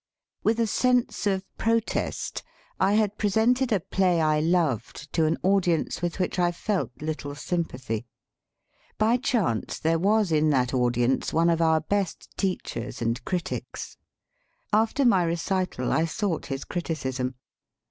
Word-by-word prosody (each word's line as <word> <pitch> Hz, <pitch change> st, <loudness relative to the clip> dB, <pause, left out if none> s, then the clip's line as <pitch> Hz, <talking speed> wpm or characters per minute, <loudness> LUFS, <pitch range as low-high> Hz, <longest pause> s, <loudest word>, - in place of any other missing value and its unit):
With 225 Hz, +2 st, +2 dB
a 230 Hz, -, +3 dB
sense 250 Hz, 0 st, +1 dB
of 190 Hz, -1 st, 0 dB
protest, 230 Hz, 0 st, -1 dB, 0.4 s
I 195 Hz, -, +3 dB
had 210 Hz, -1 st, +1 dB
presented 230 Hz, +5 st, +2 dB
a 205 Hz, -, +3 dB
play 180 Hz, 0 st, +1 dB
I 155 Hz, -1 st, +3 dB
loved, 155 Hz, -, 0 dB
to 160 Hz, -, +3 dB
an 160 Hz, -, +1 dB
audience 180 Hz, -4 st, +1 dB
with 175 Hz, -1 st, -2 dB
which 185 Hz, 0 st, -1 dB
I 175 Hz, -1 st, +3 dB
felt 195 Hz, +3 st, -1 dB
little 150 Hz, -2 st, -4 dB
sympathy. 130 Hz, -9 st, -3 dB, 0.9 s
By 225 Hz, +3 st, +3 dB
chance 230 Hz, -, 0 dB
there 165 Hz, +1 st, +1 dB
was 205 Hz, 0 st, +2 dB
in 155 Hz, 0 st, +3 dB
that 125 Hz, -3 st, +1 dB
audience 120 Hz, 0 st, +1 dB
one 165 Hz, +1 st, +4 dB
of 165 Hz, 0 st, +1 dB
our 160 Hz, -1 st, +3 dB
best 200 Hz, -4 st, -2 dB
teachers 185 Hz, -, -3 dB
and 115 Hz, +2 st, -1 dB
critics. 180 Hz, -2 st, -4 dB, 0.8 s
After 225 Hz, +6 st, +3 dB
my 195 Hz, -7 st, +5 dB
re 170 Hz, 0 st, 0 dB
cital 180 Hz, -6 st, -1 dB
I 160 Hz, -, +2 dB
sought 180 Hz, +1 st, -2 dB
his 135 Hz, -1 st, -4 dB
criticism. 130 Hz, -7 st, -3 dB
175 Hz, 145 wpm, -26 LUFS, 150-205 Hz, 0.9 s, my